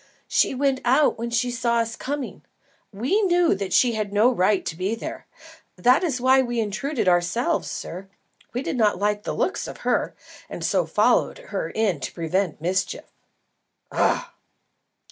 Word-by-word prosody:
"She - - +2
went 270 0 +1
out 260 +1 +3
when 235 +1 -3
she 240 +1 0
saw 235 -1 0
us 230 0 0
coming. 280 0 -5 0.5
We 255 - 0
knew 350 -3 +3
that 195 -1 -4
she 245 +5 +4
had 215 -2 -3
no 215 +5 +4
right 200 -3 +1
to 160 - -3
be 190 +6 -1
here. 230 - -7 0.5
That 250 +8 +4
is 285 -8 0
why 260 +1 +5
we 240 -2 -2
intruded 225 +4 -2
ourselves, 175 +6 +1
sir. 185 +3 -7 0.4
We 250 +3 -3
did - - -3
not 215 -3 +3
like 205 +1 0
the - - -2
looks 380 - -1
of - - -9
her, - - 0 0.3
and - - -5
so - - +1
followed - - +2
her - - -5
in 210 -8 0
to 130 - -5
prevent 170 +1 -1
mischief." 180 +4 -2 0.8
"Ah!" - - 0
235 Hz, 165 wpm, -24 LUFS, 195-260 Hz, 0.8 s, why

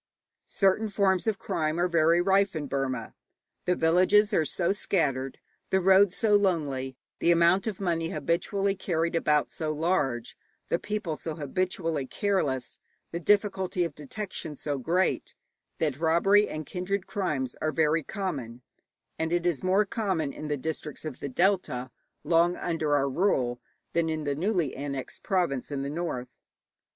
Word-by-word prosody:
Certain 200 +3 +2
forms 195 -1 +1
of 215 -3 +1
crime 155 +1 -1
are 175 - +3
very 170 0 +3
rife 195 0 +3
in 155 -2 -2
Burma. 135 -4 -3 0.5
The 180 - +2
villages 185 +6 +4
are 160 - +3
so 170 +4 +1
scattered, 140 -10 0 0.3
the 190 - +3
roads 190 +1 +5
so 215 -2 +4
lonely, 145 -10 0 0.2
the - - +2
amount 170 +4 +4
of 210 -4 -3
money 165 -4 -1
habitually 195 +5 0
carried 170 -3 -1
about 150 -3 +2
so 155 -2 -2
large, 145 -7 -1 0.3
the 170 - +1
people 210 -6 -3
so 160 0 -5
habitually 165 -1 -2
careless, 145 -12 -1 0.3
the 170 - -3
difficulty 190 -1 +1
of 165 -3 -3
detection 155 +1 -6
so 145 -1 -3
great, 175 +7 0 0.4
that 150 -3 -1
robbery 185 +6 +4
and 155 0 -5
kindred 185 +4 -3
crimes 150 -10 -2
are 155 - +1
very 155 +1 +2
common; 135 - -5 0.6
and 160 0 -1
it 175 0 +1
is 175 -5 +1
more 190 +3 +3
common 190 -9 -1
in 155 - -6
the 150 -1 -1
districts 155 +1 -4
of 150 -5 -6
the 140 - -4
delta, 130 -6 0 0.3
long 170 +1 +3
under 160 -4 0
our 140 -1 +2
rule, 130 -6 +1 0.3
than 170 -1 +1
in 155 -1 -2
the 145 -1 0
newly 175 -2 0
annexed 140 -1 -5
province 175 - 0
in 140 -2 -3
the 140 - -3
north. 150 -7 -3
165 Hz, 155 wpm, -28 LUFS, 145-190 Hz, 0.6 s, roads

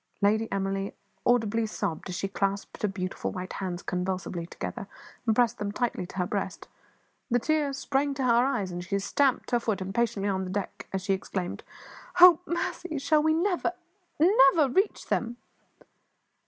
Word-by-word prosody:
Lady 220 +2 +2
Emily 195 0 -2 0.3
audibly 225 -2 +2
sobbed 170 -4 -3
as 180 - -3
she 195 - -2
clasped 195 0 -2
her 210 - +2
beautiful 185 -1 -3
white 185 -1 -6
hands 180 -2 -4
convulsively 180 -1 -3
together, - - -6 0.4
and 220 - +3
pressed 240 -2 +2
them 205 -1 -2
tightly 225 -5 -2
to 185 - -11
her 180 - +1
breast; 190 -1 -4 0.6
the 245 - +3
tears 290 +1 0
sprang 275 +1 0
to 270 - -2
her 240 -1 +4
eyes, 210 -9 -1
and 175 0 -5
she 195 +2 -1
stamped 255 +7 +1
her 240 - +3
foot 220 -3 -1
impatiently 200 +2 -1
on 190 -1 0
the 185 - -5
deck 195 +1 -4
as 190 -1 -2
she 195 0 +1
exclaimed 185 -1 -4 0.6
"Oh, 355 -2 +10
mercy! 345 -1 -2
shall 300 +2 +3
we 315 +1 +3
never, 355 0 +1 0.5
never 305 -4 +6
reach 385 - +1
them?" 240 0 -1
210 Hz, 170 wpm, -28 LUFS, 190-270 Hz, 0.6 s, Oh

